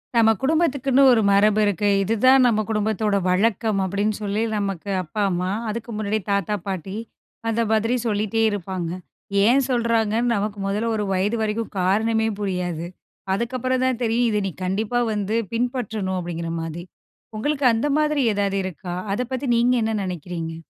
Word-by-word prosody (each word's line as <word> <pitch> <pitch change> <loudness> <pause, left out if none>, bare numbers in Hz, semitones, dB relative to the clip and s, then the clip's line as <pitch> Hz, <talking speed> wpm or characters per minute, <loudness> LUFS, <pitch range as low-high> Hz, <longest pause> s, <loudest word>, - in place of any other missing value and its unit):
நம்ம 225 -1 +5
குடும்பத்துக்குன்னு 275 -3 +2
ஒரு 225 - +3
மரபு 205 +2 +4
இருக்கு. 205 0 0 0.2
இது 220 +4 0
தான் 260 0 +7
நம்ம 215 -3 +2
குடும்பத்தோட 215 -1 0
வழக்கம் 210 +2 +1
அப்படீன்னு 205 +3 -1
சொல்லி, 205 +1 -1 0.2
நமக்கு 200 -1 -3
அப்பா, 195 +6 -4
அம்மா 180 +1 -1 0.2
அதுக்கு 230 +2 -5
முன்னாடி 215 0 -1
தாத்தா, 200 +1 0
பாட்டி 190 0 -4 0.5
அந்த 225 +1 +1
மாரி 225 +3 +2
சொல்லிட்டே 215 +1 0
இருப்பாங்க. 185 -3 -4 0.6
ஏன் 250 +5 +5
சொல்லுறாங்கன்னு 230 -1 +1
நமக்கு 205 0 -2
முதல 210 +4 -1
ஒரு 210 - -1
வயது 200 +5 0
வரைக்கும் 220 +1 -2
காரணமே 220 +4 +2
புரியாது. 180 -4 -2 0.5
அதுக்கப்புறம் 255 +4 -1
தான் 255 -2 0
தெரியும். 235 +1 +2
இத 210 -1 +1
நீ - - -3
கண்டிப்பா 210 +6 0
வந்து 210 +1 -1 0.2
பின்பற்றணும் 225 -6 -2
அப்டிங்குற 170 -1 -4
மாரி. 165 +1 -5 0.5
உங்களுக்கு 285 +4 -1
அந்த 230 +6 0
மாரி 300 -2 +2
ஏதாவது 200 -1 0
இருக்கா? 180 -1 -5 0.2
அத 210 - -1
பத்தி 260 +2 -2
நீங்க 240 +2 +3
என்ன 220 0 0
நெனைக்கிறீங்க? 170 -2 -5
215 Hz, 150 wpm, -23 LUFS, 195-235 Hz, 0.6 s, தான்